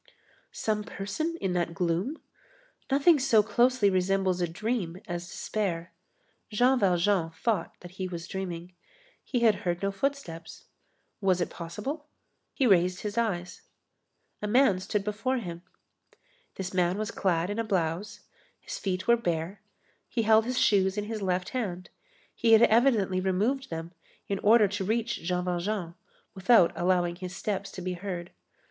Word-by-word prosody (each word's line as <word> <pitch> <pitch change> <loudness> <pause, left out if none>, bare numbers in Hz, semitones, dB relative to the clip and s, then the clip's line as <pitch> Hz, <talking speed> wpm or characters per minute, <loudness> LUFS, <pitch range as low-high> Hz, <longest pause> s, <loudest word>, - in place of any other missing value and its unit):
Some 215 -1 -1
person 230 +11 -4
in 190 -2 -1
that 170 -1 -1
gloom? 180 - -1 0.7
Nothing 285 +3 +5
so 230 -5 +4
closely 240 +1 +3
resembles 185 -1 +1
a 175 - +1
dream 185 0 -2
as 175 -1 -4
despair. 175 -4 -3 0.6
Jean 245 +4 +3
Valjean 180 -2 +2
thought 170 +2 -2
that 175 - -10
he 185 - -1
was 170 -2 -6
dreaming. 180 -2 -5 0.5
He 245 - -1
had 220 -4 +4
heard 175 +1 -2
no 195 - +1
footsteps. 195 -7 -4 0.6
Was 190 -2 +2
it 175 - -1
possible? 210 - -6 0.4
He 270 - 0
raised 180 -4 +3
his 210 -1 -4
eyes. 195 -7 -2 0.8
A 210 - -2
man 225 -4 +4
stood 200 +2 -2
before 220 +6 -1
him. 175 -7 -6 0.9
This 190 -1 -5
man 180 0 +2
was 215 0 -3
clad 175 -1 0
in 210 - -3
a - - +1
blouse; 185 -1 -2 0.4
his - - -7
feet 185 -1 -2
were 235 0 +6
bare; 175 -2 -3 0.5
he 230 - 0
held 220 0 +5
his 250 +1 -2
shoes 190 -1 +3
in 210 - 0
his 215 0 -5
left 180 -1 -1
hand; 190 -8 -4 0.4
he 230 -1 +3
had 225 +1 +8
evidently 220 -6 +3
removed 220 +9 0
them 165 -2 -5 0.4
in 200 -1 -2
order 215 0 +5
to 200 0 -3
reach 230 +4 -1
Jean 180 +1 -1
Valjean, 180 0 -2 0.4
without 190 -2 +5
allowing 175 -1 +1
his 185 0 -7
steps 195 -1 -3
to 185 - -7
be 185 0 -2
heard. 175 -1 -5
195 Hz, 155 wpm, -28 LUFS, 180-225 Hz, 0.9 s, had